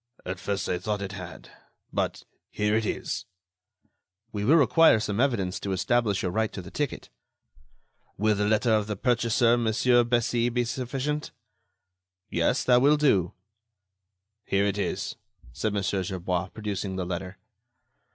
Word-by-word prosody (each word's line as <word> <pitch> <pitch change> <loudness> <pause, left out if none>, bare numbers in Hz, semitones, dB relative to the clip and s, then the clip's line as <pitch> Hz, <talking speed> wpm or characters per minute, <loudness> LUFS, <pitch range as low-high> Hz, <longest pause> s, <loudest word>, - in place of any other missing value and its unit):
"At 90 0 -4
first, 100 0 -2
I 90 - -1
thought 105 +1 -2
it 95 - -5
had... 90 -3 -9 0.4
but - - -2 0.3
here 105 0 0
it 110 -1 +1
is." - - -3 1.1
"We 105 -1 -3
will 140 +10 +5
require 160 -4 +5
some 105 -1 -2
evidence 110 -9 0
to 100 - -3
establish 105 +2 +1
your 90 - -1
right 110 +3 0
to 95 - -5
the 90 - -11
ticket." 145 -2 -3 1.1
"Will 110 +2 +2
the 105 0 0
letter 110 +2 +2
of 105 -1 +1
the 105 - -2
purchaser, 120 +2 +2
Monsieur 120 +2 +3
Bessy, 120 0 +1
be 120 0 0
sufficient!" 135 +5 -3 1.0
"Yes, - - +1
that 125 -1 +4
will 145 +3 +5
do." 100 - +2 1.1
"Here 100 +1 +1
it 100 0 -1
is," - - -3 0.4
said 110 - -1
Mon. 100 -1 -1
Gerbois, 90 -2 -1
producing 100 -2 -4
the 95 -1 -2
letter. 90 +1 -5
105 Hz, 150 wpm, -27 LUFS, 95-120 Hz, 1.1 s, will